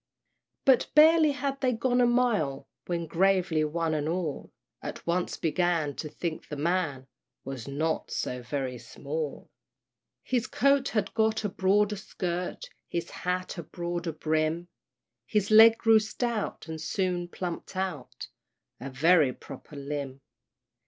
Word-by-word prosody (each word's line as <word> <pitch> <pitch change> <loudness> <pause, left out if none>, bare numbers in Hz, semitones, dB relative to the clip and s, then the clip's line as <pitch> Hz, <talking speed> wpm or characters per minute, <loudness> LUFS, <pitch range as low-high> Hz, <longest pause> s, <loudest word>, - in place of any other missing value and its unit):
But 260 -2 +4
barely 310 0 +7
had 275 -1 -3
they 255 -2 +2
gone 245 +2 +1
a 245 - +5
mile, 235 - +1 0.2
When, 170 -1 -2
gravely, 175 -2 +2
one 160 +1 -1
and 150 0 -1
all 165 -4 -3 0.3
At - - -7
once 175 +1 -1
began 165 -3 0
to 155 - -4
think 160 +1 -5
the 150 - -5
man 155 -3 -1 0.4
Was 135 -3 -6
not 155 +3 -1
so 125 0 -3
very 130 0 -3
small: 150 +3 -5 0.7
His 250 -1 0
coat 275 0 +3
had 210 -3 -1
got 220 -1 +1
a 210 - 0
broader 205 +2 +2
skirt, 180 -2 -4 0.2
His 170 - -4
hat 180 0 -3
a - - -5
broader 175 +1 -4
brim; 155 +2 -1 0.6
His 210 -1 0
leg 225 +1 +9
grew 225 -1 +5
stout, 215 -3 -3
and 160 -1 -6
soon 175 +2 -1
plumped 175 +1 -6
out 185 -8 -4 0.5
A 130 +3 -6
very 150 +1 +4
proper 145 - -11
limb. 140 -1 -5
175 Hz, 140 wpm, -28 LUFS, 155-215 Hz, 0.7 s, leg